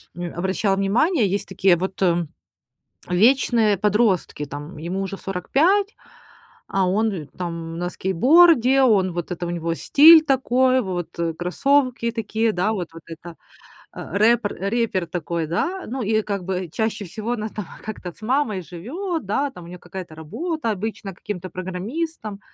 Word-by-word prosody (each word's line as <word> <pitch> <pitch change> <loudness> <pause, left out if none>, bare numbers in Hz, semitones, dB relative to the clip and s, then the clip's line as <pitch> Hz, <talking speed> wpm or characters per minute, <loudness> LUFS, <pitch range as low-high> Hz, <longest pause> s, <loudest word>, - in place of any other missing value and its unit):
м, 175 -1 -5
обращал 190 +2 0
внимание, 195 +9 +2
есть 205 - +1
такие 190 -1 +3
вот 190 +2 -4 1.1
вечные 220 +1 +3
подростки, 205 -6 +1
там 145 +4 -8
ему 175 +5 -4
уже 195 0 -4
45, 340 - +1 0.7
а 195 -1 +1
он, 215 +4 +1
э, 165 -6 -5
там 165 -2 -5
на 175 - -2
скейтборде, 265 - +4
он 195 -7 +3
вот 175 +1 -5
это, 175 0 -3
у - - -4
него 165 -1 -2
стиль 315 - +7
такой, 260 -1 +2
вот 180 -4 -5 0.2
кроссовки 250 +5 +1
такие, 225 0 -1
да, 205 +3 0
вот 180 -5 -4
вот 165 - -11
это. 165 +1 -10 0.6
Э, - - -8
рэпер, 220 -1 +3
э, 195 - -3
рэпер 215 -6 0
такой, 170 -1 -3
да. 350 - -2
Ну, 255 +3 -4
и 215 +1 +1
как 200 -3 -4
бы 185 -1 -3
чаще 220 +1 -2
всего 220 +6 -4
она 220 -2 -3
там 210 -1 -6 0.2
как-то 195 -5 -6
с - - -21
мамой 230 -4 0
живет, 295 - -5
да, 275 +9 -1
там 180 -9 -12
у 170 - -11
нее 180 - -9
какая-то 175 -2 -9
работа, 270 - -4
обычно 205 -1 -5
каким-то 185 0 -6
программистом. 205 - -5
200 Hz, 155 wpm, -22 LUFS, 180-240 Hz, 1.1 s, стиль